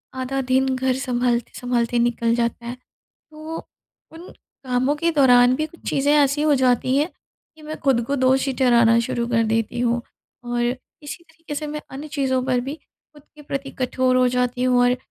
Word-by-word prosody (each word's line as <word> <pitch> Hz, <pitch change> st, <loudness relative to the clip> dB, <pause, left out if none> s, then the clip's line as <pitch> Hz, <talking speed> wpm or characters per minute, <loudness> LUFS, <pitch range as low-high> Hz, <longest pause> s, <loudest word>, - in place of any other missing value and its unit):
आधा 260 Hz, +1 st, -2 dB
दिन 260 Hz, +1 st, +1 dB
घर 255 Hz, 0 st, 0 dB
सँभालते-सँभालते 245 Hz, -1 st, -1 dB
निकल 235 Hz, -1 st, +1 dB
जाता 235 Hz, 0 st, -2 dB
है। 240 Hz, +1 st, -5 dB, 0.4 s
तो, 310 Hz, +1 st, -10 dB, 0.6 s
उन 335 Hz, +3 st, -11 dB, 0.4 s
कामों 255 Hz, +2 st, +1 dB
के 335 Hz, +3 st, +1 dB
दौरान 250 Hz, -3 st, +5 dB
भी 310 Hz, -, -1 dB
कुछ 330 Hz, +2 st, -19 dB
चीज़ें 280 Hz, +1 st, +2 dB
ऐसी 290 Hz, 0 st, +3 dB
हो 305 Hz, -1 st, +3 dB
जाती 255 Hz, 0 st, +2 dB
हैं 295 Hz, +3 st, +2 dB, 0.5 s
कि 310 Hz, -, -16 dB
मैं 310 Hz, +1 st, -6 dB
ख़ुद 265 Hz, -4 st, +3 dB
को 280 Hz, -, -1 dB
दोषी 265 Hz, +1 st, +2 dB
ठहराना 235 Hz, -3 st, +4 dB
शुरू 235 Hz, 0 st, -2 dB
कर 230 Hz, -1 st, +2 dB
देती 225 Hz, +1 st, -1 dB
हूँ। 240 Hz, 0 st, +1 dB, 0.4 s
और 240 Hz, 0 st, -2 dB, 0.4 s
इसी 315 Hz, +4 st, -8 dB
तरीक़े 320 Hz, -2 st, -10 dB
से 300 Hz, +1 st, -4 dB
मैं 300 Hz, 0 st, -5 dB
अन्य 285 Hz, +3 st, -8 dB
चीज़ों 265 Hz, -4 st, 0 dB
पर 250 Hz, -2 st, +1 dB
भी 280 Hz, -, -3 dB
ख़ुद 300 Hz, -2 st, -22 dB
के 300 Hz, -, -13 dB
प्रति 275 Hz, -1 st, -5 dB
कठोर 255 Hz, 0 st, +1 dB
हो 255 Hz, 0 st, +4 dB
जाती 250 Hz, 0 st, -1 dB
हूँ 250 Hz, -1 st, +3 dB
और 245 Hz, -, +4 dB
अ, -, -, -1 dB
260 Hz, 185 wpm, -22 LUFS, 245-290 Hz, 0.6 s, दौरान